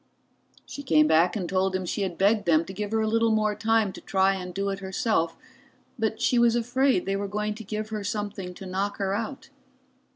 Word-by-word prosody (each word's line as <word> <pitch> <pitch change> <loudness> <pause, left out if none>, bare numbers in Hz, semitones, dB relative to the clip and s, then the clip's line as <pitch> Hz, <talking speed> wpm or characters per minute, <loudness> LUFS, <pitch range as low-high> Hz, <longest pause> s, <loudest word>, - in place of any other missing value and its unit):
She 285 - -8
came 155 - +4
back 160 +5 +3
and 185 -5 -2
told 190 +1 0
him 185 -1 -2
she 190 - -3
had 185 -3 -2
begged 205 0 +2
them 165 0 +4
to 190 - -8
give 205 +1 -4
her 220 +1 0
a 220 - 0
little 230 +1 +2
more 215 -1 +2
time 220 -1 +1
to - - -10
try 190 0 +2
and 180 -1 -5
do 195 +2 -2
it 195 0 -3
herself, 190 -3 -1 0.6
but 220 0 -1
she 245 - +2
was 235 -1 +4
afraid 245 -2 +1
they 195 - -1
were 200 0 -2
going 210 +1 -2
to 220 +2 -9
give 215 +1 -4
her 215 -2 -4
something 205 -3 -4
to 195 - -9
knock 195 +2 -2
her 195 -1 -1
out. 230 +6 -4
205 Hz, 225 wpm, -26 LUFS, 190-220 Hz, 0.6 s, came